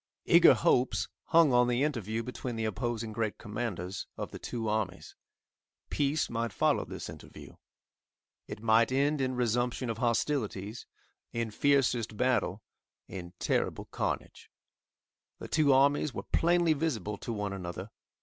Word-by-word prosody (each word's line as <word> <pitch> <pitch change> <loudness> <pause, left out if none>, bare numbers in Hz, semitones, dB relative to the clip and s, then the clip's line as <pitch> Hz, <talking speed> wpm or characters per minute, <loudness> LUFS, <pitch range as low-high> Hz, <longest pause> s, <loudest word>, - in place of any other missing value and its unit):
Eager - - +7
hopes 105 -6 +2 0.2
hung 165 -5 +5
on 125 0 +5
the 125 +2 +1
interview 115 -6 -2
between 125 0 -5
the 115 0 -2
opposing 110 0 -3
great 110 -1 -2
commanders 105 -4 -4
of - - -5
the - - -8
two 115 -2 -4
armies. 105 -3 -2 0.8
Peace 145 +1 +1
might 115 -1 -2
follow - - +2
this - - -7
interview. - - -11 0.9
It 105 - -8
might 115 +1 +4
end 140 +2 +2
in 130 -1 0
resumption 120 0 0
of 115 - -6
hostilities, 115 -4 -1 0.5
in 115 -1 -2
fiercest 120 -4 +1
battle, 110 -6 +1 0.4
in 90 -2 -8
terrible - - -1
carnage. - - -4 0.9
The - - -8
two 150 -3 +3
armies 140 +1 +3
were - - -4
plainly 170 -1 +3
visible 140 -9 -2
to 120 - -6
one 105 -3 -3
another. 95 +2 -6
115 Hz, 140 wpm, -30 LUFS, 105-135 Hz, 0.9 s, Eager